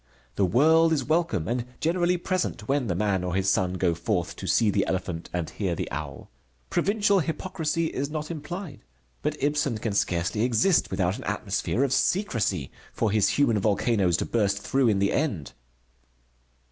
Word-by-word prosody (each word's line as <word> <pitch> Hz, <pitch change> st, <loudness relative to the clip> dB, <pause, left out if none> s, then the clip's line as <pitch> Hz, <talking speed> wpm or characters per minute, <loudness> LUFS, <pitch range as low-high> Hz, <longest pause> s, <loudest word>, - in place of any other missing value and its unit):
The 100 Hz, -, +2 dB
world 160 Hz, -, +4 dB
is 150 Hz, -, 0 dB
welcome, 160 Hz, -, 0 dB
and 120 Hz, +1 st, -1 dB, 0.2 s
generally 175 Hz, +2 st, +1 dB
present 175 Hz, -, -2 dB
when 140 Hz, -3 st, +1 dB
the 90 Hz, -, -1 dB
man 95 Hz, -1 st, 0 dB
or 90 Hz, 0 st, -2 dB
his 95 Hz, 0 st, +2 dB
son 95 Hz, -1 st, +1 dB
go 90 Hz, -2 st, +1 dB
forth 85 Hz, +2 st, -2 dB
to -, -, -6 dB
see 110 Hz, -3 st, +3 dB
the 100 Hz, -1 st, +1 dB
elephant 90 Hz, -3 st, -3 dB
and 85 Hz, -2 st, -2 dB
hear 95 Hz, -5 st, -2 dB
the -, -, -4 dB
owl. 70 Hz, -1 st, -6 dB, 0.4 s
Provincial 205 Hz, -1 st, +2 dB
hypocrisy 165 Hz, -1 st, -2 dB
is 140 Hz, -2 st, -2 dB
not 155 Hz, +1 st, -4 dB
implied. 170 Hz, -, -7 dB, 0.4 s
But 150 Hz, 0 st, -2 dB
Ibsen 145 Hz, -4 st, +1 dB
can 110 Hz, -1 st, -3 dB
scarcely 90 Hz, +1 st, 0 dB
exist 125 Hz, -, +3 dB
without 95 Hz, 0 st, -1 dB
an -, -, -8 dB
atmosphere 130 Hz, -, -1 dB
of 135 Hz, -2 st, +1 dB
secrecy 115 Hz, -, 0 dB, 0.2 s
for 110 Hz, -, 0 dB
his 105 Hz, -1 st, +3 dB
human 120 Hz, -7 st, +3 dB
volcanoes 100 Hz, -3 st, +2 dB
to -, -, -2 dB
burst 100 Hz, -4 st, +1 dB
through 135 Hz, +5 st, +1 dB
in 105 Hz, -3 st, +3 dB
the 100 Hz, 0 st, +1 dB
end. 120 Hz, -, -1 dB
115 Hz, 170 wpm, -26 LUFS, 95-155 Hz, 0.4 s, world